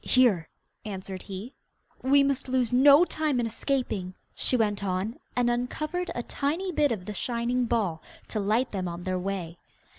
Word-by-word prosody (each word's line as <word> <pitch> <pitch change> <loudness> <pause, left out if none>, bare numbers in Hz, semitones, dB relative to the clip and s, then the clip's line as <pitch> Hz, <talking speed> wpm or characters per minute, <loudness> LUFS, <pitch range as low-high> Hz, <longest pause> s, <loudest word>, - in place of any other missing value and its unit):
'Here,' 225 -11 +3 0.3
answered 190 -2 -6
he. 200 +6 -7 0.5
'We 275 +2 +5
must 275 -1 0
lose 255 -2 +1
no 285 +6 +7
time 305 -6 0
in 240 - +1
escaping,' 225 -6 -2 0.2
she 255 - +2
went 205 -3 0
on, 195 +8 -2 0.2
and 245 -1 +2
uncovered 305 +9 -1
a 240 - -2
tiny 330 +11 -2
bit 295 -4 +2
of 195 -6 -3
the 210 - -5
shining 240 +3 0
ball, 205 -9 0 0.3
to 215 - -2
light 220 +6 +1
them 185 -3 -2
on 175 0 -5
their 185 0 -1
way. 180 -3 -4
235 Hz, 170 wpm, -27 LUFS, 195-265 Hz, 0.5 s, no